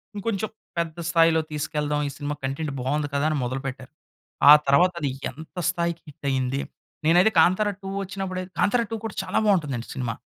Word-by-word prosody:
ఇంకొంచెం 215 0 -2 0.3
పెద్ద 165 -1 -3
స్థాయిలో 165 -1 +4
తీసుకెళ్దాం 150 0 -1
ఈ - - -7
సినిమా 145 0 -3
కంటెంట్ 140 +2 -3
బావుంది 145 +3 -1
కదా! 140 - +1
అని 155 - 0
మొదలుపెట్టారు. 130 +2 -5 0.6
ఆ - - +13
తర్వాత 175 +6 +5
అది 140 - 0 0.2
ఎంత 160 +6 -13
స్థాయికి 170 -1 -2
హిట్ 140 - -14
అయింది. 130 0 0 0.5
నేనైతే 180 +7 +5
'కాంతార 185 +6 +4
2' 195 - -5
వచ్చినప్పుడైతే 190 -1 -5
'కాంతారా 235 +3 +3
2' 225 - -2
కూడా 220 - -5
చాలా - - -2
బావుంటుందండి 150 - +1
సినిమా. 125 -3 -2
160 Hz, 165 wpm, -25 LUFS, 140-185 Hz, 0.6 s, ఆ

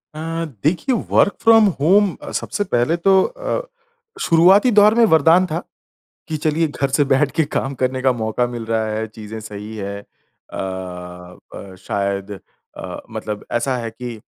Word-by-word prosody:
अ, 165 +1 -3 0.2
देखिए 185 - +1
work 200 - +3
from 225 -1 +6
home 190 +5 +3
अ, - - -8
सबसे 205 - -2
पहले 120 +7 +2
तो 190 +2 +4
अ, - - -3 0.6
शुरुआती 185 +8 +5
दौर 210 0 +6
में 235 -1 +5
वरदान 165 +1 +4
था, 170 -1 -3 0.7
कि 155 - -2
चलिए 155 +2 0
घर 140 -1 -2
से 145 - +3
बैठ 135 +1 +3
के 160 - +3
काम 140 -2 -3
करने 130 0 -1
का 130 0 +3
मौका 115 +1 -1
मिल 120 -1 -6
रहा 110 -1 0
है, 110 +1 -2
चीज़ें 110 0 -9
सही 105 +1 -8
हैं। 100 0 -5
अ - - -16 1.0
अ, 95 -1 -9
शायद 100 0 -2 0.5
अ, - - -7
मतलब 105 -1 -5
ऐसा 125 +2 0
है 115 -2 -4
कि 120 0 -7
140 Hz, 165 wpm, -19 LUFS, 110-175 Hz, 1.0 s, from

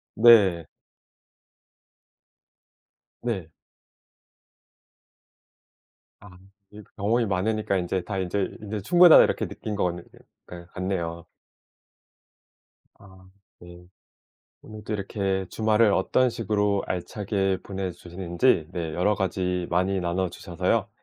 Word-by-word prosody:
네. 105 -7 +5 2.5
네. 95 -9 -3 2.7
아 95 -3 -15 0.3
이게 105 0 -12
경험이 115 +4 +1
많으니까 100 +1 -1
인제 90 +1 -2
다 95 +2 -5
인제 95 +1 -2
'인제 105 0 -5
충분하다.' 175 - +7
이렇게 - - -1
느낀 105 - -6
것 100 - 0
같네 85 -1 -3 0.5
약간 85 -1 -10
같네요. 85 -3 -4 1.7
아. 95 -1 -17 0.3
네. 85 0 -14 0.8
오늘 110 0 -11
또 - - -5
이렇게 95 -2 -2
주말을 110 0 +2
어떤 125 +7 +2
식으로 105 -3 0
알차게 95 +1 -2
보내 95 -1 -4
주시는지 85 +1 0
네 80 -3 -4
여러 105 +4 +1
가지 90 -2 -2
많이 95 +2 +1
나눠 90 +1 -1
주셔서요. 85 -1 -2
95 Hz, 210 characters per minute, -25 LUFS, 90-105 Hz, 2.7 s, 충분하다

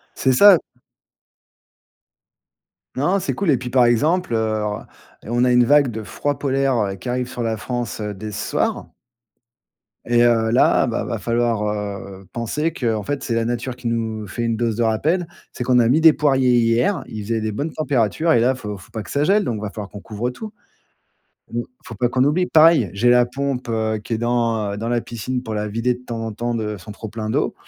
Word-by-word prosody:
C'est 130 - +2
ça. 200 +10 +8 2.4
Non, 195 +2 +1
c'est 190 - -2
cool. 195 -5 +1
Et 135 - +3
puis, 125 0 -6
par 125 -1 +4
exemple, 150 +6 +1
heu, 110 -1 0 0.6
on 120 +3 0
a 125 - +3
une 125 0 +5
vague 140 +1 +4
de 110 0 -6
froid 145 +6 -3
polaire, 135 -1 +1 0.2
heu, - - -5
qui 95 - -10
arrive 125 0 -1
sur 125 -2 -4
la 115 -1 -1
France, 120 0 -4
dès 105 0 -5
ce - - -4
soir. - - -1 1.2
Et 120 0 +3
heu, 115 -2 +3
là, 130 +2 +4
bah, 115 - -1
il - - -7
va 115 - -2
falloir, 115 +1 0
heu, 100 -2 -5
penser 135 +8 -2
qu'en 115 -8 -2
fait 145 +7 -3
c'est 115 - -2
la 115 - +1
nature 120 +2 -3
qui 120 -1 -4
nous 110 -2 -3
fait 115 +5 -4
une 115 -1 0
dose 115 -1 -1
de 120 - +1
rappel. 155 +11 +1 0.2
C'est 125 - -5
qu'on 125 0 +3
a 115 -1 +3
mis 145 +6 +4
des 160 -1 +7
poiriers 130 -5 +3
hier, 120 - +2
il 110 -1 -6
faisait 115 +1 -1
des 110 0 -2
bonnes 145 +9 -4
températures, 145 +2 0
et 120 - +5
là, 120 +3 +3
il 130 - -4
faut 105 -5 -6
faut 95 - -16
pas 110 - -5
que 100 - -11
ça 145 +1 +1
gèle. 205 +4 +3
Donc, 120 - -2
il 105 - -7
va 105 - -3
falloir 105 -1 -7
qu'on 105 - -9
couvre 110 +4 -4
tout. 215 - -8 1.0
Mmh, 120 - -1 0.2
faut 115 - -9
pas 120 +4 0
qu'on 130 +2 +2
oublie. 175 +6 +2
Pareil, 155 - +5
j'ai 120 +5 +3
la 125 0 +5
pompe, 135 0 -3
heu, 110 -1 -1
qui 115 - -3
est - - -2
dans, 115 -3 0
heu, - - -4
dans 115 +2 -3
la 120 -1 0
piscine, 125 +2 -4
pour 110 - -6
la 105 0 -2
vider, 115 +4 0
de 125 - -13
temps 115 -2 -5
en 115 - -4
temps, 120 +3 -3
de 105 -2 -3
son 90 +4 -11
trop 110 +1 -8
plein 110 -1 -5
d'eau, - - 0
120 Hz, 225 wpm, -21 LUFS, 110-130 Hz, 2.4 s, ça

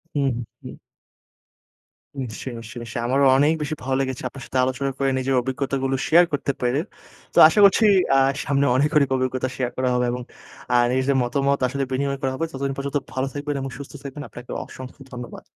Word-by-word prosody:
হুম, 140 -2 +2 0.3
হুম। - - -9 1.5
নিশ্চয়ই, 120 +1 -6
নিশ্চয়, 115 +2 -9
নিশ্চয়ই। 120 0 -5
আমারও 135 +3 +3
অনেক 145 +3 +4
বেশি 150 +1 -2
ভালো 135 0 0
লেগেছে 130 -1 -3
আপনার 135 - -10
সাথে - - -3
আলোচনা 130 +2 -1
করে, 135 -1 +1
নিজের 130 0 0
অভিজ্ঞতাগুলো 135 +1 -1
share 175 +2 +6
করতে 140 0 0
পেরে। 125 +3 +1 0.5
তো - - -7
আশা 205 - +1
করছি 200 +3 +6 0.3
আ - - +6 0.3
সামনে 140 0 +2
অনেক, 140 +3 +3
অনেক 140 -2 +3
অভিজ্ঞতা 130 0 -1
share 125 -2 -2
করা 130 0 +1
হবে 125 0 +1
এবং 125 0 -4 0.5
আ - - +4 0.2
নিজেদের 130 +2 +1
মতামত 140 +3 +1
আসলে 140 +2 -2
বিনিময় 140 +1 -1
করা 135 - 0
হবে। 165 - -1
ততদিন 135 -1 -3
পর্যন্ত 140 +1 -2 0.2
ভালো 130 +1 -1
থাকবেন 145 0 -3
এবং 135 - -4
সুস্থ 140 0 -9
থাকবেন, 140 +1 -7
আপনাকে 125 +3 -10
অসংখ্য 130 +2 -11
ধন্যবাদ। 125 -1 -8
135 Hz, 185 wpm, -23 LUFS, 130-140 Hz, 1.5 s, share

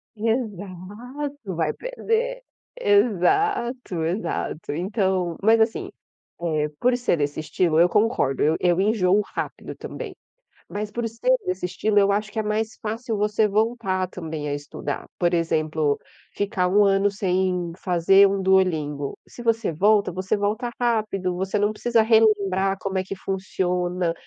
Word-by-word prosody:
Exato, 220 +3 -4
vai 160 -2 0
perder. - - -2 0.3
Exato, 235 - +1
exato, 165 -3 -3
então, 185 -1 -1
mas 225 +2 +5
assim, 220 0 0 0.6
eh, 150 -1 +1
por 250 0 +3
ser 245 -8 +1
desse 145 0 -2
estilo 160 +1 +1
eu 170 - +7
concordo, 210 - +1
eu 155 +2 +3
eu 175 0 +2
enjoo 200 -1 +3
rápido - - -5
também, - - -7 0.5
Mas 210 +1 -4
por 235 +1 -2
ser 240 +3 +2
desse 180 0 -2
estilo 205 +4 +1
eu 200 0 +4
acho 210 +1 -1
que - - -5
é - - +2
mais 215 +1 -2
fácil 225 +1 -3
você 210 +1 +2
voltar 205 -3 0
também 160 -4 -5
a 145 - -1
estudar. 145 +1 -5
Por 175 -1 +2
exemplo, 155 -3 0 0.4
ficar 200 -2 0
um 205 +3 +4
ano 195 0 +3
sem 185 -3 0
fazer 185 +3 +5
um 195 0 -1
duolingo. 160 -7 +1
Se 240 - -10
você 225 -5 +1
volta, 205 +5 +3
você 185 +4 -1
volta 210 +4 -1
rápido, 215 -6 0
você 190 +3 -1
não 205 +1 +2
precisa 230 +1 +2
relembrar 205 -4 +3
como 195 -1 -2
é 185 - -1
que 195 - -5
funciona. 180 -2 -1
195 Hz, 145 wpm, -24 LUFS, 180-220 Hz, 0.6 s, eu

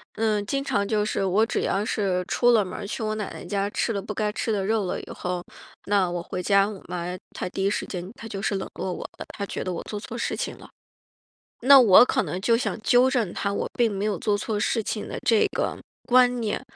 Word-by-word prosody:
嗯， 215 -2 0
经 275 +5 -1
常 200 -6 0
就 210 -1 +1
是 195 - -1
我 205 +4 +3
只 - - -1
要 200 +2 0
是 190 -4 0
出 245 0 +4
了 220 -3 +5
门 185 - -7
儿， - - -5
去 225 - -4
我 215 0 -1
奶 210 -3 -4
奶 - - -8
家 200 +2 -1
吃 230 - -1
了 200 -2 -2
不 210 +2 -6
该 210 0 -1
吃 225 - -2
的 195 -2 -1
肉 220 -1 +1
了 180 - -2
以 - - -13
后， 180 -1 -3 0.4
那 195 -3 +3
我 175 -1 -3
回 180 - -4
家， 200 +1 +4
我 205 -3 -8
妈 175 -1 -4 0.3
她 - - -4
第 195 +1 -2
一 - - +4
时 205 - -2
间 180 -1 -6
她 225 - -9
就 195 -2 -5
是 205 - 0
冷 190 - -3
落 185 - -3
我 - - -6 0.2
了， - - -5
她 200 - -2
觉 - - -5
得 185 - -3
我 170 - -5
做 210 - -5
错 225 +3 -7
事 - - -2
情 - - -4
了。 - - -14 0.9
那 270 +3 +9
我 225 -3 +8
可 - - +1
能 180 - -4
就 230 +3 +3
想 255 - -2
纠 245 +3 +4
正 235 -9 0
她， 200 0 -2
我 - - -2
并 235 -2 +3
没 195 0 -3
有 210 -3 0
做 205 -2 +1
错 210 0 -2
事 225 +1 0
情 210 0 -3
的 - - -5
这 225 -3 +4
个 - - -1 0.3
观 250 -1 +4
念， 215 -2 -2
205 Hz, 275 characters per minute, -25 LUFS, 195-225 Hz, 0.9 s, 那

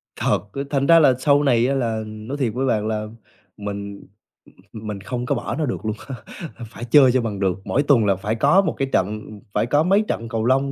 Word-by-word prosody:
Thật - - 0
á, 140 - -3
thành 140 -1 0
ra 165 0 +7
là 135 -4 +5
sau 145 +1 +3
này 120 -3 +3
á 140 - +1
là 115 -4 -1
nói 110 +6 -7
thiệt 120 -6 -1
với 130 +2 -1
bạn 110 -4 0
là 110 -1 -2 0.5
mình 100 -1 -6 0.7
mình 105 -3 -6
không 125 +3 -4
có 140 - 0
bỏ 120 - -4
nó 155 - -1
được 120 -3 -4
luôn 110 0 -1
á, 135 - -5 0.6
phải 120 - -7
chơi 130 +1 +6
cho 130 -1 +2
bằng 105 -4 -4
được. 95 -2 0
Mỗi 140 - +1
tuần 130 -7 +4
là 100 -1 +3
phải 105 +4 -3
có 145 - +4
một 170 - -1
cái 135 - -1
trận 105 +3 0 0.3
phải - - +1
có 145 +5 +2
mấy 195 +4 +3
trận 115 +1 -3
cầu 115 -1 -2
lông 135 +2 +2
120 Hz, 235 wpm, -22 LUFS, 110-140 Hz, 0.7 s, ra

